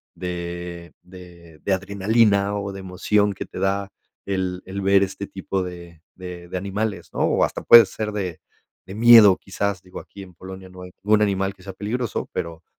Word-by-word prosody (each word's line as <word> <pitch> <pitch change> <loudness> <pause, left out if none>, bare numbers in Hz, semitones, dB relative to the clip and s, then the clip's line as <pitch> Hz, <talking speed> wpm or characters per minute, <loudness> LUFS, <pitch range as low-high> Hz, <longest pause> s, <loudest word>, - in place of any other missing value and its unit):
de 85 -1 -6
de 85 -3 -15
de 100 - -1
adrenalina 100 +1 +2
o 100 -1 -4
de 95 - -8
emoción 100 +2 0
que 100 - -6
te - - -9
da 100 +1 -1 0.3
el 95 -2 -2
el 100 +1 -5
ver 100 0 +4
este 100 +1 -5
tipo 95 0 -3
de 85 -2 -9
de 90 -1 -9
de 90 - -3
animales, 100 +2 -3
¿no? - - -5
O - - +2
hasta - - -2
puede 115 -2 +9
ser 105 +2 -5
de 95 -5 -4 0.5
de 95 - -9
miedo 110 -4 +8
quizás, 100 -1 -3
digo 90 0 -10
aquí 100 - -12
en 90 - -14
Polonia. 95 +2 -10
No 90 0 -13
hay 90 0 -10
un 105 +1 +3
animal 95 -1 0
quizás 95 0 -10
peligroso, 110 +4 -3
pero, 85 -2 -5
95 Hz, 185 wpm, -22 LUFS, 90-100 Hz, 0.5 s, puede